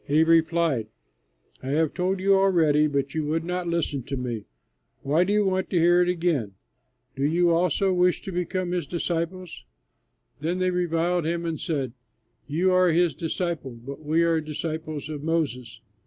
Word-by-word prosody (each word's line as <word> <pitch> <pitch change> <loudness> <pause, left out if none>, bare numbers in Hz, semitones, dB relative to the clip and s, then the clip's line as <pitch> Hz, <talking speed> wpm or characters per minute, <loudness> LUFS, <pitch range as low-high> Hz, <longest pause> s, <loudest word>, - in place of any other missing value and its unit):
He 150 +3 +4
replied, 165 -7 +2 0.7
"I 130 - -8
have 155 +2 +1
told 185 +1 -1
you 195 +1 +3
already, 165 -6 +4
but 140 -1 -2
you 155 - -1
would 160 +2 -1
not 180 0 -3
listen 170 -5 -1
to 135 +1 -4
me. 120 -4 -4 0.6
Why 150 +5 +3
do 190 - -1
you 210 0 +3
want 190 0 0
to 175 - +1
hear 175 +2 +5
it 180 - +2
again? 165 - 0 0.6
Do 135 - -3
you 170 +4 +3
also 180 +3 +2
wish 180 0 +2
to 195 - -6
become 180 0 -2
his 175 -5 -2
disciples?" 170 +1 -3 0.8
Then 165 +5 -1
they 185 0 +1
reviled 175 -1 0
him 170 +1 -2
and 165 -2 -3
said, 135 -7 -2 0.5
"You 170 +6 +1
are 185 -1 +4
his 170 +1 +2
disciple, 165 -5 -3
but 140 +6 -9
we 160 +3 +2
are 165 -1 +2
disciples 155 -1 -5
of 150 -2 -6
Moses. 150 -6 -2
165 Hz, 170 wpm, -25 LUFS, 150-180 Hz, 0.8 s, hear